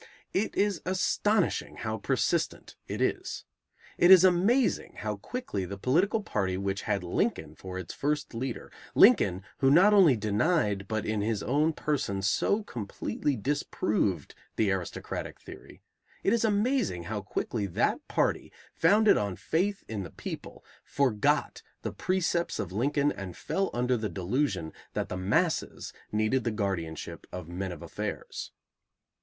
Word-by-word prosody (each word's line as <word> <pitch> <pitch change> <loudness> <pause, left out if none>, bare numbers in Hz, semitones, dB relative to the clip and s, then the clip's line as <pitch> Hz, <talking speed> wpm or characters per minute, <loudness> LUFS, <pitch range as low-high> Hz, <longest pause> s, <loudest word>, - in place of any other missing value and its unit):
It 205 +3 0
is 200 -3 +1
astonishing 190 +1 +1
how 110 -1 -3
persistent - - -1
it - - -1
is. - - -2 0.5
It 175 - +6
is 190 -2 +10
amazing 195 +8 +3
how 105 -1 -3
quickly 245 - -4
the 100 +2 -6
political 185 - +2
party 95 - -1
which 100 +1 -2
had 100 -3 +1
Lincoln 90 - -1
for 95 -1 -8
its 90 -3 -6
first 145 -1 -2
leader, 120 +1 -4 0.2
Lincoln, 90 +2 +6 0.2
who 135 - +4
not 185 +9 +6
only 180 -10 +7
denied, 105 - +1
but 110 0 -2
in 110 -1 -1
his 110 -1 -1
own 150 +5 +2
person 130 -12 -1
so 200 - +2
completely 120 - -3
disproved 105 - -1 0.2
the 105 -3 +2
aristocratic 95 -3 -4
theory, - - -13 0.4
it 200 - +3
is 235 - +2
amazing 210 - +1
how 105 +3 -4
quickly 105 +1 -2
that 85 - +1
party, - - 0 0.2
founded 205 +6 +5
on 100 -3 -1
faith 195 - -1
in 110 -2 -4
the 90 - -6
people, - - -8 0.2
forgot 125 -7 +1 0.2
the - - -3
precepts 175 -2 0
of 90 - -4
Lincoln 140 +7 +1
and 95 -3 -7
fell 195 0 -1
under 125 +1 +1
the 110 -2 -2
delusion 95 - -1 0.2
that - - -2
the - - -3
"masses" 95 +2 0 0.2
needed 110 +4 +1
the 120 - 0
guardianship 95 -7 -4
of 90 -3 -6
"men 90 +2 -4
of 85 - -8
affairs." - - -5
115 Hz, 145 wpm, -29 LUFS, -, 0.5 s, is